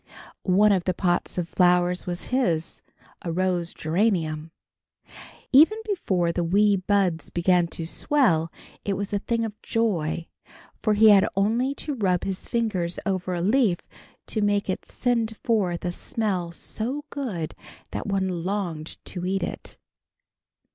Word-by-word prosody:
One 205 +3 +4
of 185 -3 +1
the 185 - 0
pots 175 -1 0
of 175 -2 -1
flowers 180 0 +2
was 175 0 -4
his, 175 -11 0 0.4
a 170 - -3
rose 180 -1 0
geranium. 160 -3 0 1.0
Even 320 +11 +7
before 190 - 0
the 175 +1 -1
wee 200 +4 +4
buds 185 -3 0
began 175 0 +2
to 165 0 -5
swell, 170 - +2 0.3
it 200 - -1
was 200 +1 -4
a 205 - +1
thing 230 +2 -1
of 215 -1 -8
joy, 170 -8 0 0.6
for 215 -1 +2
he 220 +1 +7
had 205 -1 +6
only 230 +8 +1
to 295 - -4
rub 190 -8 +1
his 190 -1 -4
fingers 195 -7 -1
over 185 -2 -1
a 170 - -2
leaf 210 -1 +3 0.5
to 215 - -2
make 205 -1 +1
it - - -5
send 230 -3 -1
forth 195 -8 0
a 175 - 0
smell 185 -3 -2
so 250 - -3
good 210 - -4 0.4
that - - -4
one 190 -4 -1
longed 175 -5 -3
to 180 - -5
eat 190 +1 0
it. - - -6
190 Hz, 150 wpm, -25 LUFS, 175-215 Hz, 1.0 s, Even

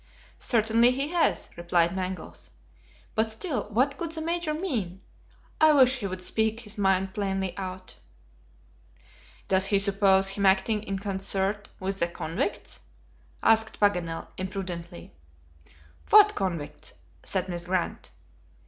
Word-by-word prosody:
"Certainly 230 +1 +4
he 275 +3 -2
has," 345 0 +1
replied 170 0 +1
Mangles; 185 0 -5 0.6
"but 220 0 +1
still, 225 - -3
what 260 +6 +1
could 330 -1 -4
the 320 - -3
Major 335 0 -1
mean? 235 - -3 0.6
I 310 -1 +7
wish 260 -2 +5
he 200 - -2
would 185 -1 -6
speak 220 +3 0
his 210 -2 -7
mind 190 -2 +1
plainly 195 -3 -2
out." 185 -1 -7 1.5
"Does 190 0 +3
he 200 - +3
suppose 195 -1 +3
him 200 +1 -3
acting 210 +3 +3
in 195 -2 -3
concert 195 +1 -2
with 195 +1 -3
the 170 - +2
convicts?" 175 - -3 0.6
asked 225 0 +3
Paganel, 180 -5 +1
imprudently. 180 - -6 1.0
"What 420 0 +8
convicts?" 170 - -4 0.3
said 190 -1 -1
Miss 175 -1 -4
Grant. 180 -1 -2
195 Hz, 125 wpm, -27 LUFS, 185-230 Hz, 1.5 s, What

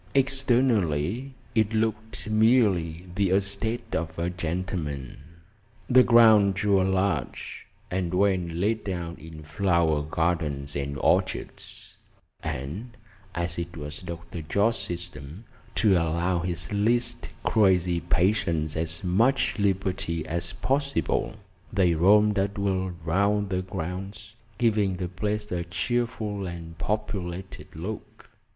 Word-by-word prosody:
Externally, 125 - +1 0.2
it 110 -1 +2
looked 110 0 -1
merely 105 -7 +3
the 100 0 +1
estate 100 +4 -1
of 80 0 -3
a 85 +1 -1
gentleman. 85 -5 -4 0.7
The 130 0 +7
grounds 110 -5 +6
were 100 -2 +4
large, 95 -7 -1 0.2
and 90 -2 -1
well 95 0 +3
laid 95 +6 -1
out 85 -2 -4
in 80 -1 -10
flower 80 -1 +1
gardens 75 -3 -1
and 70 0 -3
orchards; - - -1 0.4
and 95 - -5 0.4
as 85 0 -2
it 85 0 -5
was 75 0 -6
Dr. 85 -1 -7
Jorce's 100 +9 +1 0.2
system 80 +3 -9 0.3
to 105 -3 +4
allow 85 +1 +1
his 85 0 -3
least 120 +3 0
crazy 90 -5 +3
patients 85 -3 +1
as 80 +2 -1
much 110 +8 +2
liberty 95 -5 0
as 85 +1 -2
possible, 140 -5 -1 0.4
they 90 -4 +3
roamed 105 +5 +5
at 100 +1 -1
will 95 -2 0 0.2
round 100 +4 +1
the 90 0 0
grounds, 95 +3 -6 0.2
giving 105 -4 +2
the 90 0 -3
place 105 +3 -2
a 90 -1 -1
cheerful 105 +2 -2
and 85 -1 -7
populated 95 -2 -4
look. 95 +7 -7
95 Hz, 115 wpm, -26 LUFS, 85-105 Hz, 0.7 s, The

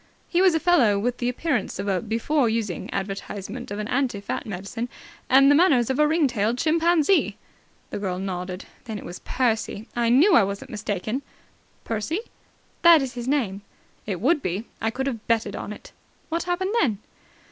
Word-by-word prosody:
He 350 - +2
was 370 -3 +5
a - - +2
fellow 290 - +4
with 245 +4 -1
the 245 - 0
appearance 250 -2 -1
of 195 +2 -4
a 190 -2 +1
before 230 +4 +1
using 220 -6 -2
advertisement 200 +4 -5
of 205 - -4
an 210 0 -3
anti 250 -4 0
fat 200 - -4
medicine 210 +5 -5 0.4
and 275 +2 +7
the - - +7
manners 285 -7 +4
of 265 - -2
a 300 - +5
ring 315 0 +3
tailed 230 -2 0
chimpanzee." 330 +4 +2 0.5
The - - -3
girl 185 -3 -2
nodded. 185 0 -4 0.2
"Then 220 -3 -5
it - - -9
was 175 - -7
Percy! 225 -3 -1
I 235 -1 +2
knew 300 - +5
I 230 - +7
wasn't 200 +1 -4
mistaken." 215 +3 -3 0.6
"Percy?" 230 - -2 0.6
"That 335 -4 +7
is 260 - -4
his 240 0 -6
name." 230 -9 0 0.5
"It 190 -4 -2
would 280 - +2
be! 185 +3 -3 0.2
I 225 - +1
could 265 +4 -3
have 235 -5 -4
betted 220 -3 +1
on - - -5
it." 210 - -10 0.4
"What 335 +1 -1
happened 375 +3 -1
then?" 225 -9 +1
235 Hz, 185 wpm, -24 LUFS, 205-290 Hz, 0.6 s, and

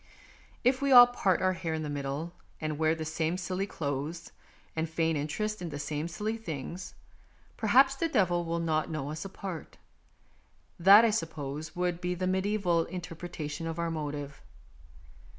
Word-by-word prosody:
If 255 +2 +3
we 280 0 +1
all 245 -1 +11
part 195 -8 +1
our 185 0 +3
hair 165 -3 -3
in 155 - -3
the - - -3
middle, 145 +3 -4 0.3
and 155 -1 -3
wear 160 0 +3
the 160 -1 -5
same 160 +2 -1
silly 185 +2 -2
clothes, 150 +2 -4 0.4
and 160 0 -1
feign 160 0 +1
interest 210 +9 -2
in 175 - -4
the 145 - -5
same 150 +2 -3
silly 210 +7 -3
things, 175 -2 -6 0.6
perhaps 260 +5 +5
the 300 +5 -1
devil 175 - +2
will 165 0 -2
not 160 -1 0
know 150 -3 -3
us 155 +5 -5
apart; 190 -3 -7 1.0
that, 200 +6 +9
I 225 - +3
suppose, 155 -6 -4
would 180 -1 -1
be 180 0 -1
the 185 +1 -2
mediseval 185 -3 +1
interpretation 165 -3 -5
of 165 0 -4
our 170 -1 -1
motive. 145 -2 -5
170 Hz, 165 wpm, -30 LUFS, 155-190 Hz, 1.0 s, all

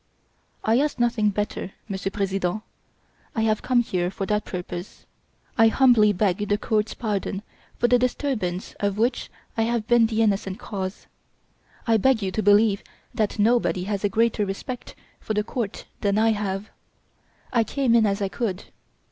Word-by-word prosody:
"I 225 +3 +3
ask 295 -1 0
nothing 235 -3 +2
better, 205 -1 -3
Monsieur 195 -1 -3
President. 195 0 -1 0.7
I 225 - +1
have 215 -1 +1
come 250 -1 +3
here 180 -6 -1
for 195 +1 -4
that 210 +1 0
purpose. 180 0 -7 0.5
I 225 - +8
humbly 225 -3 +5
beg 205 +1 0
the 205 - +3
court's 215 -1 0
pardon 205 -2 -2 0.3
for 240 - +3
the 245 0 +4
disturbance 240 -8 -1
of 200 -1 0
which 240 +3 0 0.3
I 225 - 0
have 230 -1 0
been 240 -2 +5
the 225 0 +1
innocent 195 -2 0
cause. 190 -1 -5 0.8
I 225 -1 +4
beg 230 0 +3
you 190 - -1
to 215 - -1
believe 205 0 +4 0.3
that 220 -3 -1
nobody 215 -4 +2
has 200 +1 -3
a 205 - +2
greater 225 +1 +2
respect 205 +5 -5 0.2
for 215 - -3
the 210 - +1
court 220 -2 -4
than 200 0 +1
I 225 +1 +4
have. 205 -1 -3 0.8
I 235 -2 +4
came 255 +2 +1
in 225 -2 +5
as 200 +1 0
I - - +1
could." 195 -2 -3
210 Hz, 165 wpm, -24 LUFS, 195-230 Hz, 0.8 s, I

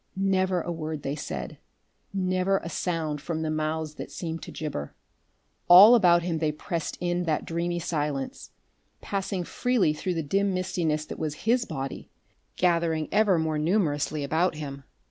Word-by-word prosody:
Never 190 -2 +1
a 175 - -4
word 155 -2 -4
they 140 - -2
said, 150 - -6 0.5
never 185 0 +1
a 165 - -5
sound 160 -5 -2
from 160 0 -3
the 155 - -1
mouths 155 0 -2
that - - -6
seemed 165 -2 -5
to - - -8
gibber. 145 - -5 0.7
All 195 +7 +10
about 175 -7 +5
him 170 -2 -1
they 155 -1 +1
pressed 165 +2 -4
in 175 0 -1
that 155 -3 0
dreamy 170 +1 -2
silence, 150 -5 -3 0.5
passing 195 -2 -2
freely 235 -5 +1
through 180 +4 -3
the 165 - -1
dim 195 +5 +1
mistiness 165 -4 -1
that - - -7
was 155 +2 -4
his 240 +2 +3
body, 135 - -5 0.5
gathering 170 -3 +1
ever 205 -3 +4
more 160 -1 0
numerously 155 -4 0
about 160 +4 +1
him. 140 -2 -7
165 Hz, 160 wpm, -27 LUFS, 155-185 Hz, 0.7 s, All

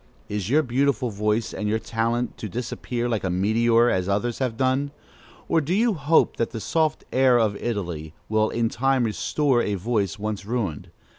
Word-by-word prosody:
Is 105 -2 -3
your 155 +4 +4
beautiful 130 -1 0
voice 105 +2 -1
and 105 - -2
your 110 - +2
talent 115 +2 -1
to 110 - -5
disappear 120 +2 -3
like 115 -3 -1
a 95 - 0
meteor, 115 +6 +3
as 95 -4 0
others 105 +4 -1
have 125 -4 -1
done? 130 +2 +1 0.6
or 165 - +2
do 160 +5 -1
you 230 +2 +3
hope 155 -1 +2
that 115 - 0
the 115 - -6
soft 155 +6 0
air 130 -1 +5
of 110 -3 +2
Italy 85 -9 -4
will 110 0 +2
in 115 -1 0
time 135 +3 +1
restore 125 +3 +1
a 105 - -1
voice 100 -1 -1
once 105 -1 -4
ruined? 105 - -3
115 Hz, 180 wpm, -24 LUFS, 105-130 Hz, 0.6 s, air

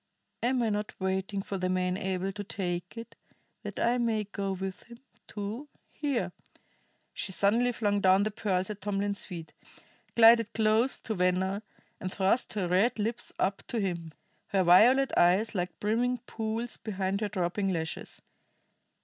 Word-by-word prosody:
Am 245 +1 +1
I 225 - +1
not 210 0 -3
waiting 190 +1 -1
for 195 -1 -4
the 185 0 0
man 180 0 0
able 190 0 -2
to 205 +1 -6
take 180 0 -4
it, 230 - -8 0.5
that - - -6
I 240 +1 +2
may 225 -3 +1
go 200 -1 -4
with 190 0 -5
him, 235 0 -13 0.3
too? 215 +7 -5 0.2
Here 285 -5 -1 0.4
" - - -41
She - - -3
suddenly 225 +6 +3
flung 205 -4 0
down 190 +1 +5
the 215 - -1
pearls 190 -2 -1
at 210 - -8
Tomlin's 200 0 -1
feet, 170 -4 -8 0.6
glided 230 -1 +6
close 220 +3 +2
to 220 - -2
Venner, 185 +1 +1 0.4
and 185 - -4
thrust 195 +6 +1
her 200 -4 -1
red 190 +8 +2
lips 225 +2 -2
up 195 +1 0
to 235 - -2
him, 170 -5 -3 0.4
her 195 -3 +2
violet 240 +10 +6
eyes 185 +6 +4
like 180 -2 -3
brimming 240 +4 +1
pools 225 +1 -3
behind 195 -1 -2
her 210 - -1
drooping 195 0 -1
lashes. 160 -2 -4
200 Hz, 160 wpm, -29 LUFS, 185-225 Hz, 0.6 s, glided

